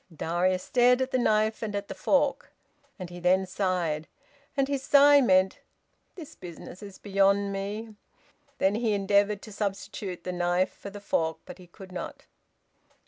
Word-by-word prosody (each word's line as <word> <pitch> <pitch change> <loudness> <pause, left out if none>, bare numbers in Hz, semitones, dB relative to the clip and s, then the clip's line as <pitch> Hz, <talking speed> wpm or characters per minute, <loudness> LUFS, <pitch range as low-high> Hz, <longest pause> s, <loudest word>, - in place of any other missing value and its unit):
Darius 175 +3 0
stared 250 0 +4
at 260 0 -1
the 255 - +1
knife 220 -2 +1
and 215 -2 -3
at 200 0 -3
the - - -6
fork, 280 +8 0 0.5
and 180 -2 -8
he 175 - -8
then 185 +2 +3
sighed, 180 -5 -1 0.5
and 270 -1 +2
his 280 -1 -2
sigh 285 +1 +6
meant, 185 -5 +3 0.6
"This 325 -6 -10
business 180 +1 -11
is 200 -2 -10
beyond 200 0 +2
me!" 210 +3 -5 0.6
Then 190 +1 +2
he 220 0 0
endeavoured 200 +1 +2
to 215 - -10
substitute 195 -3 -4
the 180 - -3
knife 175 +1 0
for 200 - -9
the 205 0 -10
fork, 160 -5 -1
but - - -11
he 180 - -14
could 185 +1 -13
not. 180 - -7
200 Hz, 165 wpm, -27 LUFS, 185-220 Hz, 0.6 s, sigh